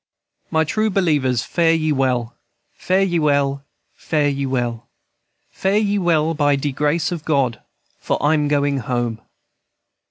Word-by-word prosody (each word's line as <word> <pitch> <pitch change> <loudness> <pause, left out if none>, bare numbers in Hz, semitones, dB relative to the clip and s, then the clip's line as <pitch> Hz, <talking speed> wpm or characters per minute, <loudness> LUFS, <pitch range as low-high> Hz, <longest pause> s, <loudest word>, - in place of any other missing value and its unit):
"My 160 0 +2
true 215 +8 0
believers, 150 - +1
fare 165 -1 +2
ye 155 -1 0
well, 125 -4 0 0.4
Fare 190 +1 +1
ye 175 -3 0
well, 140 -2 +1 0.3
fare 150 -2 0
ye 140 -1 -2
well, 120 -3 -2 0.6
Fare 195 +2 0
ye 205 -1 +1
well, 165 -3 +1
by 145 -2 +2
de 140 +1 -2
grace 150 +5 0
of 170 -3 -4
God, 135 -7 0 0.4
For - - -1
I'm 150 0 +2
going 145 -1 +1
home. 120 -2 -2
145 Hz, 140 wpm, -20 LUFS, 135-165 Hz, 0.6 s, My